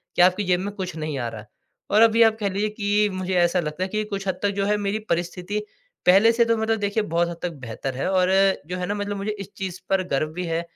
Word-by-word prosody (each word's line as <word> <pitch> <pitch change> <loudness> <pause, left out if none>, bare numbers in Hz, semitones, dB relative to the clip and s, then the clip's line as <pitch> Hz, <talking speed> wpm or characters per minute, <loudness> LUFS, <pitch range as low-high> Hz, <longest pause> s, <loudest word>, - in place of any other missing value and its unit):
कि - - +3
आपकी 185 +3 +4
जेब 180 -1 +2
में 200 +2 -4
कुछ 185 -4 -5
नहीं 155 -2 -3
आ 120 - -2
रहा। 110 -2 -9 0.5
और 210 - +5
अभी 230 0 +5
आप 220 0 +3
कह 200 -2 0
लीजिए 205 +3 -1
कि 210 0 +1
मुझे 185 0 -3
ऐसा 175 +1 +3
लगता 155 +2 -3
है 185 - -1
कि 215 +2 -1
कुछ 200 -2 -5
हद 185 -1 -1
तक 205 - +3
जो 195 - +1
है 210 +1 +2
मेरी 205 +1 -1
परिस्थिति 180 +4 -2 0.5
पहले 195 +5 +6
से 235 0 +3
तो 230 0 +2
मतलब 220 0 0
देखिए 205 +1 0
बहुत 170 0 +2
हद 170 - -6
तक 180 - -1
बेहतर 125 +3 -5
है 135 +8 -1
और 185 -1 +3 0.4
जो 180 +1 -4
है 180 - -2
ना 205 - -2
मतलब 205 0 -3
मुझे 200 +2 -2
इस 195 0 -8
चीज़ 185 -2 -5
पर 190 -1 +2
गर्व 155 +3 0
भी 180 +2 -4
है 165 0 -1
190 Hz, 270 wpm, -24 LUFS, 175-210 Hz, 0.5 s, पहले